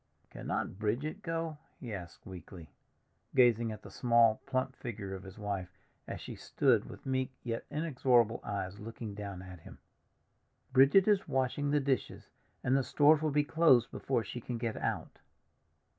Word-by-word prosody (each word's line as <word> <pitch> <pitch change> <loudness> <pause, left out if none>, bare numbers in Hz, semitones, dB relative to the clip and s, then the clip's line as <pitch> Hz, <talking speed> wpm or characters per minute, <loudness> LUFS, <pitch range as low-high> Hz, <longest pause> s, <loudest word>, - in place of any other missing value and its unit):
"Cannot 95 - -3
Bridget 130 - -2
go?" 165 -4 -3 0.2
he 120 -4 -6
asked 85 -3 -8
weakly, 90 -3 -10 0.6
gazing 120 -3 +4
at 105 -1 -8
the - - -11
small, 115 -3 +4
plump 130 0 -1
figure 100 -6 -6
of 95 - -6
his 95 0 -11
wife, 95 -4 -4 0.3
as - - -5
she - - -7
stood - - +1
with - - -11
meek 130 -1 0
yet 115 -2 -4
inexorable 125 -7 +2
eyes 100 -1 -4
looking 110 0 -7
down 100 -3 -6
at 90 -1 -10
him. - - -13 1.0
"Bridget 135 +10 +6
is 205 -3 +3
washing 135 +1 0
the 145 +1 +3
dishes, 135 -2 -2 0.3
and 130 - +2
the 135 - +4
stores 150 +3 +5
will 155 - +1
be 150 0 +2
closed 145 -6 +4
before 130 -4 -1
she 120 - -6
can 120 +1 -4
get 115 -1 -2
out." - - -3
120 Hz, 160 wpm, -32 LUFS, 105-140 Hz, 1.0 s, Bridget